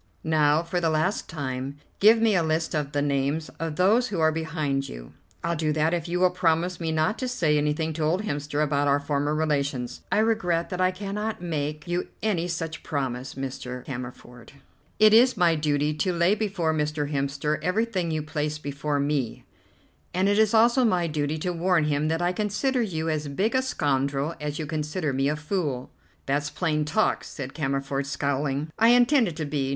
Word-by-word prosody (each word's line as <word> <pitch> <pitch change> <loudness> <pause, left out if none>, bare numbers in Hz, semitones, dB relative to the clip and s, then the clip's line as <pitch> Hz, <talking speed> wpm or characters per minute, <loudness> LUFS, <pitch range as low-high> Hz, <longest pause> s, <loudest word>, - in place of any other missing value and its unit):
Now, 155 0 +3
for 175 +1 -2
the 165 - +2
last 160 +6 0
time, 135 -2 -4 0.2
give 220 +3 +7
me 225 -1 +3
a 180 - +3
list 160 0 0
of 150 -2 -1
the 145 -1 0
names 145 +2 0
of 165 -1 -3
those 215 +9 +3
who 195 -5 -3
are 160 0 +4
behind 155 -4 -2
you." - - -10 0.3
"I'll 170 - 0
do 155 -1 0
that 155 +2 +1
if 170 -2 -2
you 175 +1 -1
will 185 0 +4
promise 175 0 +1
me 165 -2 -2
not 160 +7 0
to 255 - -2
say 170 -12 +1
anything 150 +2 0
to 160 - -5
old 165 +6 +1
Hemster 145 -4 -1
about 145 -1 +1
our 140 0 +3
former 145 +1 -1
relations." 140 -5 -1
"I - - +2
regret 210 -7 +1
that 180 0 -2
I 185 - +4
cannot 205 +3 -4
make 155 -3 -3
you 175 +1 -1 0.2
any 180 -6 0
such 165 -2 -4
promise, 135 -2 -3
Mr. 125 -1 -6
Cammerford. 125 -2 -8 0.4
It 215 0 +6
is 245 +1 +6
my 175 -3 +4
duty 150 -1 +1
to 180 +5 0
lay 170 +2 +3
before 195 -7 0
Mr. 150 -1 -1
Hemster 140 +2 -1
everything 190 -2 0
you 155 -1 -1
place 150 -1 -2
before 145 0 -2
me, 140 -5 -1 0.7
and 185 +2 +2
it 205 +1 +3
is 220 0 +4
also 235 +3 +5
my 180 -7 +2
duty 150 -1 -1
to 180 +3 -2
warn 175 -1 +2
him 150 0 0
that 165 +2 0
I 175 - +2
consider 215 +6 0
you 165 -7 -2
as 155 -2 -1
big 190 +11 0
a 260 - +3
scoundrel 140 - 0
as 150 0 -3
you 155 - -3
consider 150 0 -2
me 135 +2 +1
a 150 - 0
fool." 150 -5 -3 0.3
"That's 145 +2 0
plain 155 -4 -1
talk," 160 +9 +1
said 135 -2 -7
Cammerford, 135 -1 -2
scowling. 140 +1 -1
"I 225 - +6
intend 245 +1 +5
it 170 - -5
to 155 - -3
be. 140 -2 -1
155 Hz, 195 wpm, -26 LUFS, 145-180 Hz, 0.7 s, give